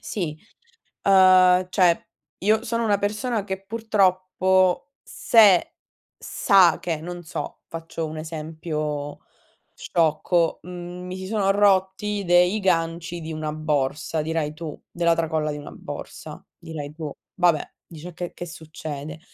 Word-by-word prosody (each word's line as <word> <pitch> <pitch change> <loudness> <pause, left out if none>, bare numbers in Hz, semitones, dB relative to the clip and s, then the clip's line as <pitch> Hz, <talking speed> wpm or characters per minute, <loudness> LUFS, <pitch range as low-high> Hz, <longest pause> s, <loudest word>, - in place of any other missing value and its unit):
sì. 170 -7 -3 0.7
Uhm, 185 -1 +6
cioè 180 -3 +3 0.4
io 215 +3 +3
sono 230 0 -1
una 205 -3 +2
persona 210 +1 -1
che 190 -1 -5
purtroppo 185 -4 +2 0.2
se 210 -6 +4 0.4
sa 190 -5 +4
che, 165 -4 -3
non 175 +2 -7
so, 160 - -6
faccio 165 0 -5
un 155 - -7
esempio 155 -2 -4 0.6
sciocco, 165 +1 +1
mhmm, 180 +1 -8
mi 185 - -6
si 190 0 -6
sono 195 -1 +1
rotti 200 0 +2
dei 180 +3 +4
ganci 170 -2 -1
di 160 0 -6
una 155 -1 -3
borsa, 155 0 -1
dirai 155 -1 -2
tu 155 -1 -7
della 170 -1 +2
tracolla 160 -2 -1
di 150 - -6
una 145 - -9
borsa, - - -9
dirai 150 -3 -7
tu: 155 -2 -6 0.2
"Vabbè", 175 -4 +3 0.2
dici: 165 +1 -10
"E - - -10
che 175 +1 -5
che 175 - -7
succede?" 155 -3 -8
175 Hz, 135 wpm, -24 LUFS, 160-190 Hz, 0.7 s, Uhm